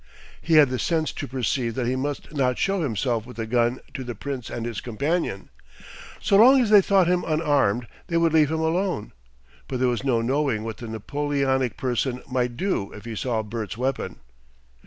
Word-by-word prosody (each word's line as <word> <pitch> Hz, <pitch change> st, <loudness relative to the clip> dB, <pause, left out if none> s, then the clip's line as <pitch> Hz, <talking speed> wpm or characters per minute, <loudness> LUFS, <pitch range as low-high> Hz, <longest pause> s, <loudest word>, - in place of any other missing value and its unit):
He 165 Hz, -, +2 dB
had 150 Hz, -3 st, +7 dB
the 130 Hz, -, -1 dB
sense 160 Hz, -3 st, 0 dB
to -, -, -6 dB
perceive 125 Hz, -2 st, -1 dB
that 130 Hz, -, -1 dB
he 125 Hz, +2 st, 0 dB
must 145 Hz, +3 st, -4 dB
not 130 Hz, -4 st, +1 dB
show 195 Hz, -1 st, 0 dB
himself 120 Hz, -4 st, -1 dB
with 125 Hz, -, -11 dB
the 115 Hz, -, -2 dB
gun 120 Hz, +2 st, +1 dB
to 130 Hz, -, -5 dB
the 120 Hz, -2 st, -6 dB
Prince 135 Hz, +1 st, -5 dB
and 115 Hz, -1 st, -4 dB
his 115 Hz, -4 st, -4 dB
companion. 125 Hz, -, -2 dB, 0.7 s
So 195 Hz, -, +3 dB
long 260 Hz, +6 st, +8 dB
as 230 Hz, -4 st, +1 dB
they 205 Hz, -2 st, +9 dB
thought 195 Hz, -1 st, +3 dB
him 180 Hz, +1 st, +1 dB
unarmed 145 Hz, -8 st, +1 dB, 0.2 s
they 170 Hz, -2 st, 0 dB
would 165 Hz, -1 st, +2 dB
leave 155 Hz, -2 st, +5 dB
him 160 Hz, 0 st, -1 dB
alone, 165 Hz, -, -1 dB, 0.6 s
but 130 Hz, -, -3 dB
there 130 Hz, -, +3 dB
was 120 Hz, 0 st, -2 dB
no 130 Hz, -4 st, +2 dB
knowing 130 Hz, -3 st, 0 dB
what 115 Hz, 0 st, -5 dB
the 120 Hz, -, -8 dB
Napoleonic 130 Hz, +1 st, -1 dB
person 125 Hz, 0 st, -1 dB
might 125 Hz, -2 st, -1 dB
do 185 Hz, -, -1 dB
if 105 Hz, -, -11 dB
he 115 Hz, -1 st, -5 dB
saw 115 Hz, 0 st, -1 dB
Bert's 110 Hz, 0 st, -5 dB
weapon. 130 Hz, +2 st, -2 dB
130 Hz, 200 wpm, -24 LUFS, 120-155 Hz, 0.7 s, they